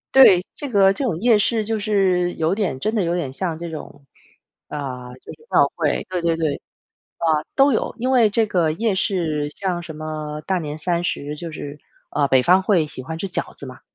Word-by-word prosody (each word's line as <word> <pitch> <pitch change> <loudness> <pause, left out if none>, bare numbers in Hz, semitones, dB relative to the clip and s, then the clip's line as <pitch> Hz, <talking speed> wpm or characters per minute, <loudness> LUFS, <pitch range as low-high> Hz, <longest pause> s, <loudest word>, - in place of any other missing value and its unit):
对。 190 -9 +8
这 285 - -4
个 195 -4 +5
这 275 - -3
种 185 -11 -1
夜 230 0 +4
市 220 +1 +1
就 220 +1 -1
是 190 -4 +1
有 165 +4 0
点 185 -11 -1
真 215 - -1
的 210 - +2
有 170 0 0
点 145 -7 -3
像 165 -1 -3
这 170 - -5
种， 145 -2 -9 0.6
呃， 125 -4 -5
就 - - -11
是 460 - -18
庙 - - +5
会。 - - 0
对 180 -2 -2
对 165 -1 +1
对。 155 -4 -1 0.6
嗯， 160 -2 +2
都 275 0 +5
有。 - - 0
因 255 +3 -1
为 235 -4 +5
这 220 +1 +2
个 175 -6 +1
夜 215 +4 0
市 160 -7 -1
像 180 +1 -3
什 160 -2 -9
么 155 -1 -5
大 190 -1 +1
年 150 -1 -5
三 170 +2 -1
十， 150 -4 -3
就 165 +2 -7
是， 145 -1 -7 0.3
呃， 145 -1 +1
北 130 -1 +4
方 185 +6 +5
会 180 -6 +2
喜 140 -3 -8
欢 160 +5 -6
吃 195 - -3
饺 175 - -3
子 140 - -9
嘛。 130 -1 -11
170 Hz, 230 characters per minute, -21 LUFS, 150-200 Hz, 0.6 s, 对